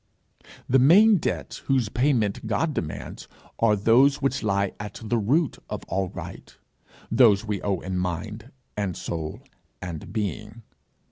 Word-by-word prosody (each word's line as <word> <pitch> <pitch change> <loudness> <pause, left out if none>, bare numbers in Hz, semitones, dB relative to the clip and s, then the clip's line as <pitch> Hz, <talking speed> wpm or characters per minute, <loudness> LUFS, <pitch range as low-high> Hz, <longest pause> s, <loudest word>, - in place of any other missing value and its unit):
The 135 - +4
main 200 - +6
debts - - -3
whose 130 -6 +2
payment 115 -4 0
God 115 +9 0
demands 75 - -5 0.3
are 110 -2 +4
those 120 +7 +4
which 135 -1 0
lie 100 -2 0
at 105 0 -7
the 115 +2 0
root 140 +8 +1
of - - -5
all 95 -1 -1
right, - - -10 0.5
those 115 -3 +5
we 105 -3 -3
owe 100 -3 -1
in 95 0 -3
mind, 105 - -4 0.2
and 100 -4 -2
soul, 80 -2 -5 0.4
and 85 -3 -7
being. 105 +1 -4
110 Hz, 140 wpm, -25 LUFS, 100-130 Hz, 0.5 s, main